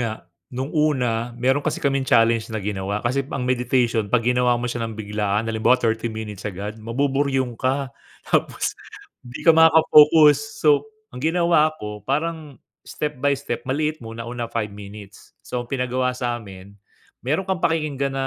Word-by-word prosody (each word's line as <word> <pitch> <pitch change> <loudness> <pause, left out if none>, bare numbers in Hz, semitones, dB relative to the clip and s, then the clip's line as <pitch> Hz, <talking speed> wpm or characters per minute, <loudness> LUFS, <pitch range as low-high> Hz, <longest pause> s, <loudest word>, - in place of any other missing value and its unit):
nga. 115 -2 -1 0.4
No'ng 130 +3 -5
una 125 -7 0
meron 130 +4 +1
kasi - - -2
kaming 135 -2 -1
challenge 115 0 +3
na 110 - -4
ginawa. 100 0 -3
Kasi 130 +3 +1
ang 130 -2 -3
meditation 125 -3 +1
'pag 115 +1 +1
ginawa 125 0 +2
mo 120 - -4
siya 120 0 -3
nang 115 -1 -4
biglaan, 105 0 -1
halimbawa 115 +2 +2
30 115 -1 -1
minutes 110 -2 -6
agad, 105 +3 -7
mabuburyong 135 +2 0
ka. 130 +2 -2 0.3
Tapos - - 0 0.5
'di 120 -1 -10
ka 165 - +8
makaka-focus. 160 +3 +6
So 150 +6 +4 0.2
ang 125 - -8
ginawa 160 -1 +2
ko 105 -5 -7
parang 150 - -3 0.3
step-by-step. 140 -3 -2
Maliit 155 +3 -1
muna, 115 0 -8
una 120 0 -5
5 110 -3 -3
minutes. 100 -1 -12
So 125 - -3
ang 120 - -8
pinagawa 125 -1 -1
sa'min, 105 -6 -5 0.5
meron 155 +9 -1
kang 190 -1 -2
pakikinggan 145 -5 -1
na 135 0 -1
125 Hz, 155 wpm, -22 LUFS, 115-140 Hz, 0.5 s, ka